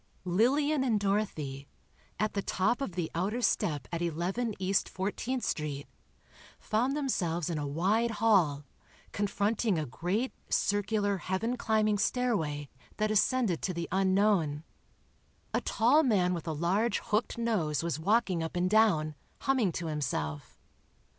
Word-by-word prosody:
Lillian 265 Hz, -, +2 dB
and 230 Hz, -5 st, +2 dB
Dorothy, 160 Hz, -10 st, -2 dB, 0.5 s
at 215 Hz, +1 st, 0 dB
the 200 Hz, -, -1 dB
top 220 Hz, +7 st, 0 dB
of 240 Hz, -10 st, -3 dB
the 170 Hz, -2 st, -3 dB
outer 195 Hz, +8 st, -1 dB
step 170 Hz, -, 0 dB
at 170 Hz, -1 st, -3 dB
11 180 Hz, +7 st, -1 dB
East 190 Hz, +1 st, 0 dB
14th 225 Hz, +6 st, -2 dB
Street, 145 Hz, -2 st, -2 dB, 0.7 s
found 245 Hz, +6 st, 0 dB
themselves 175 Hz, -, -1 dB
in 160 Hz, -, -2 dB
a 145 Hz, -, -3 dB
wide 195 Hz, +11 st, +1 dB
hall, 175 Hz, -11 st, +3 dB, 0.5 s
confronting 205 Hz, 0 st, 0 dB
a 155 Hz, -, -1 dB
great 180 Hz, -, -2 dB, 0.2 s
circular 205 Hz, 0 st, +1 dB
heaven 190 Hz, +7 st, -2 dB
climbing 215 Hz, -3 st, +1 dB
stairway 195 Hz, -, 0 dB, 0.3 s
that 215 Hz, 0 st, +1 dB
ascended 215 Hz, -4 st, +2 dB
to 185 Hz, -, -2 dB
the 170 Hz, 0 st, -3 dB
unknown. 190 Hz, -5 st, +2 dB, 0.9 s
A -, -, +1 dB
tall 250 Hz, +8 st, +3 dB
man 195 Hz, -, +2 dB
with 170 Hz, -1 st, -5 dB
a -, -, 0 dB
large 190 Hz, +8 st, +1 dB
hooked 215 Hz, +3 st, -1 dB
nose 185 Hz, -, 0 dB
was 170 Hz, -2 st, -2 dB
walking 195 Hz, -1 st, +2 dB
up 160 Hz, +1 st, -4 dB
and 180 Hz, +1 st, +1 dB
down, 195 Hz, -9 st, +3 dB, 0.3 s
humming 260 Hz, -8 st, +2 dB
to 170 Hz, -, -4 dB
himself. 80 Hz, -, -3 dB
195 Hz, 140 wpm, -30 LUFS, 165-225 Hz, 0.9 s, hall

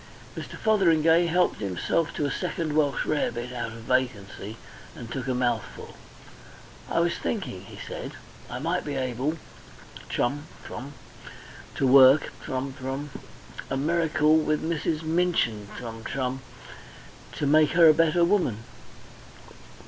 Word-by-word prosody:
Mr. -, -, -7 dB
Fotheringay 170 Hz, -5 st, +4 dB
helped 180 Hz, +2 st, +2 dB
himself 100 Hz, -, -1 dB
to 150 Hz, -, -1 dB
a 140 Hz, -, -1 dB
second 165 Hz, -4 st, -2 dB
Welsh 150 Hz, -2 st, +1 dB
rarebit 125 Hz, -5 st, -1 dB
out 115 Hz, -2 st, -4 dB
of 115 Hz, 0 st, -10 dB
vacancy, 110 Hz, -4 st, -2 dB, 0.4 s
and 120 Hz, -2 st, -9 dB
took 135 Hz, 0 st, -4 dB
a 130 Hz, -, 0 dB
mouthful. 120 Hz, -3 st, -2 dB, 1.0 s
"I -, -, +1 dB
was 170 Hz, 0 st, 0 dB
thinking," 180 Hz, -, -3 dB
he -, -, -12 dB
said, -, -, -6 dB, 0.4 s
"I 120 Hz, -, -5 dB
might 165 Hz, +7 st, -1 dB
be 145 Hz, -2 st, -4 dB
able 130 Hz, +4 st, -1 dB, 0.7 s
(chum, 145 Hz, +5 st, -1 dB, 0.2 s
chum) 140 Hz, +3 st, -7 dB, 0.8 s
to -, -, +1 dB
work 135 Hz, +2 st, +7 dB
(chum, 130 Hz, +1 st, -3 dB
chum) 135 Hz, +2 st, -4 dB, 0.6 s
a 135 Hz, -, -1 dB
miracle 155 Hz, 0 st, +3 dB
with 155 Hz, -1 st, 0 dB
Mrs. 160 Hz, -1 st, -1 dB
Minchin 160 Hz, -, 0 dB
(chum, 115 Hz, -2 st, -7 dB
chum) 130 Hz, 0 st, -2 dB, 1.0 s
make 150 Hz, +1 st, +4 dB
her 170 Hz, -2 st, +7 dB
a 155 Hz, -, +8 dB
better 165 Hz, +2 st, +3 dB
woman." 170 Hz, -, +1 dB
145 Hz, 130 wpm, -26 LUFS, 125-165 Hz, 1.0 s, a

